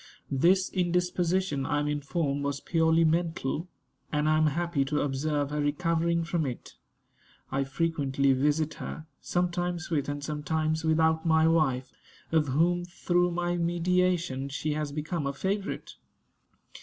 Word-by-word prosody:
This 180 +8 +3
indisposition, 180 -3 0
I 145 +1 0
am 145 - -1
informed, 145 0 -1
was 140 -1 -2
purely 165 -1 +2
mental; 165 -1 0 0.4
and 150 0 +1
I 155 - +4
am 155 - +4
happy 165 -1 0
to 150 +2 0
observe 145 +1 -1
her 150 0 -1
recovering 165 +3 +1
from 165 -3 -1
it. 125 - -7 0.8
I 135 +1 0
frequently 140 -2 +1
visit 150 +3 +1
her, 155 - -6 0.2
sometimes 175 -1 -1
with 145 -3 0
and 145 0 -4
sometimes 155 +1 -1
without 160 0 +2
my 160 -1 +4
wife, 135 -6 +1 0.4
of 160 -2 +3
whom, 170 +6 +2
through 175 0 +1
my 175 0 -1
mediation, 170 -5 +1
she 150 +2 -2
has 150 -1 -2
become 150 +1 -3
a 140 - -2
favorite. 195 +7 -3
160 Hz, 140 wpm, -28 LUFS, 145-175 Hz, 0.8 s, I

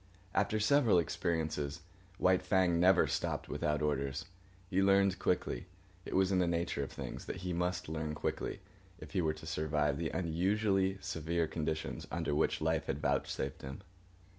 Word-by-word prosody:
After 110 - +1
several 115 -1 +4
experiences, 80 -4 -1 0.4
White 95 0 +4
Fang 90 -2 +2
never 90 +1 +6
stopped - - -2
without 75 0 0
orders. 70 +1 -1 0.4
He 95 +1 +1
learned 100 -1 +4
quickly. 60 +8 0 0.4
It - - -4
was 95 0 +3
in 95 - +3
the 90 - +3
nature 85 -3 0
of 70 - -4
things, - - -6
that - - -4
he 90 - -1
must 90 +1 -1
learn 80 -1 -3
quickly - - -3 0.4
if - - -11
he - - +1
were 80 -2 +1
to 80 - -11
survive 75 -2 0
the 80 -1 -1
unusually 95 +3 +1
severe 85 -2 -1
conditions 80 0 -3
under 85 -3 -1
which 75 - +1
life 80 0 0
was - - -1
vouchsafed 65 0 -1
him. 65 +6 -7
85 Hz, 165 wpm, -34 LUFS, 75-95 Hz, 0.4 s, never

